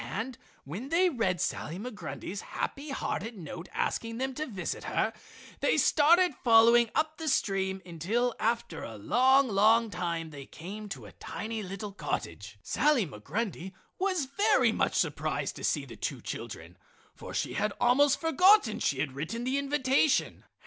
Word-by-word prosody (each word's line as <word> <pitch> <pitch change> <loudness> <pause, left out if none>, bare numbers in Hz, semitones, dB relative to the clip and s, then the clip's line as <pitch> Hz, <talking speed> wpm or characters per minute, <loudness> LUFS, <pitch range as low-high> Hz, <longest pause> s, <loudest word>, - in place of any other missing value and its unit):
And 225 - -4 0.3
when 195 - -6
they 355 +3 +3
read 190 - 0
Sally 165 - -2
Migrundy's 205 -3 -6
happy 285 +2 -5
hearted 225 -4 -3
note 170 0 -8
asking 230 0 -2
them 265 +1 -2
to 305 +4 -4
visit 190 -7 -4
her - - 0 0.5
they - - +2
started 340 +3 +5
following 235 0 +6
up 310 +1 0
the 320 - -4
stream 190 -7 0
until 205 +9 -1
after 230 -7 -1
a 110 - -7
long, 260 - +4
long 220 +2 +4
time 170 -4 -3
they 140 -2 -9
came 205 +5 -8
to - - -6
the - - -11
tiny 220 0 -5
little 200 +1 -6
cottage. 100 - -5
Sally 290 -6 +2
Migrundy 180 - -4 0.3
was 370 -6 0
very 280 +10 +3
much - - 0
surprised - - -1
to - - -9
see - - 0
the - - -11
two - - -3
children, - - -7 0.4
for - - -10
she - - -2
had 210 - 0
almost 270 +4 +4
forgotten 330 - +4
she 135 - 0
had 145 - -2
written 160 - -4
the 260 +3 0
invitation. 280 0 +1
230 Hz, 155 wpm, -29 LUFS, 185-270 Hz, 0.5 s, following